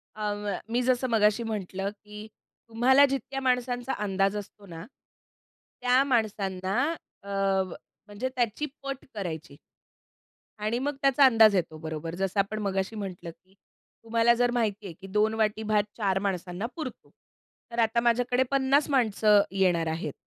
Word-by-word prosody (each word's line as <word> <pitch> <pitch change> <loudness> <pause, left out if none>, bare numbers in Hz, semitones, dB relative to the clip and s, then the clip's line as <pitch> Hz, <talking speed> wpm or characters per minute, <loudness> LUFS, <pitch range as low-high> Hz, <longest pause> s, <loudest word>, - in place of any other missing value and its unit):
अं, 210 -1 -2
व्य 200 -3 -2
मी 245 +1 +1
जसं 255 0 +1
मगाशी 220 0 +2
म्हटलं, 195 -3 -3
की 210 +1 -12 0.4
तुम्हाला 260 +5 +5
जितक्या 270 0 -3
माणसांचा 250 0 0
अंदाज 195 0 0
असतो 205 0 -9
ना, 165 -1 -9 1.0
त्या 250 +2 +4
माणसांना 200 -7 -1 0.5
अ, - - -14
व 195 -2 0 0.4
म्हणजे 210 +6 -3
त्याची 240 +4 0 0.2
पट 275 -1 -5
करायची. 160 -8 -6 1.0
आणि 215 +3 -1
मग 285 +2 -2
त्याचा 275 0 +5
अंदाज 225 -5 +6
येतो 165 -3 -1
बरोबर, 160 +1 -5
जसं 195 +2 -1
आपण 205 +2 0
मगाशी 195 +1 -2
म्हटलं, 185 -4 -6
की 185 +3 -28 0.5
तुम्हाला 230 +1 +3
जर 245 0 +1
माहिती 215 -4 -1
आहे, 175 - -6
की 195 - -9
2 210 +3 +1
वाटी 220 0 0
भात 215 -1 +2
4 195 -3 +1
माणसांना 185 +1 -3
पुरतो. 310 -6 -7 0.6
तर 235 - -4
आता 225 +1 +2
माझ्याकडे 245 +2 +2
50 275 +2 +2
माणसं 215 -5 +4
येणार 180 -4 +2
आहेत. 160 -2 -3
210 Hz, 150 wpm, -27 LUFS, 195-245 Hz, 1.0 s, अंदाज